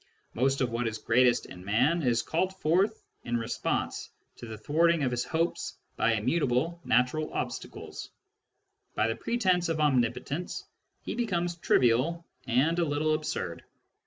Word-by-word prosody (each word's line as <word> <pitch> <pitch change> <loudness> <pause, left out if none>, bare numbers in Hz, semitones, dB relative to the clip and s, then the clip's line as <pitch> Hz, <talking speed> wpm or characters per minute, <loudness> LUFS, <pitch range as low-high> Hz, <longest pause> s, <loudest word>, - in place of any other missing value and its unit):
Most 135 +3 +1
of 125 -2 +1
what 115 0 -1
is 110 -1 -3
greatest 120 +2 +3
in 90 - -11
man 125 - +2
is 120 -5 +2
called 185 +3 -1
forth 190 +8 +1 0.2
in 120 0 -1
response 115 -1 -2 0.3
to 120 - -9
the 110 -1 -7
thwart 160 +9 +3
ing 165 -3 0
of 130 - +1
his 120 0 0
hopes 165 +1 -2 0.2
by 115 - +2
immutable 135 +7 0
natural 125 +6 +1
obstacles; - - -5 0.9
by 110 - +2
the 115 - -1
pretence 185 -8 +1
of 160 -1 -1
omnipotence, 140 +3 0 0.4
he - - -4
becomes 175 -7 -1
trivial 150 +4 +2 0.2
and 140 +8 +2
a - - +3
little 155 0 +1
absurd. 150 - -3
145 Hz, 150 wpm, -29 LUFS, 120-170 Hz, 0.9 s, greatest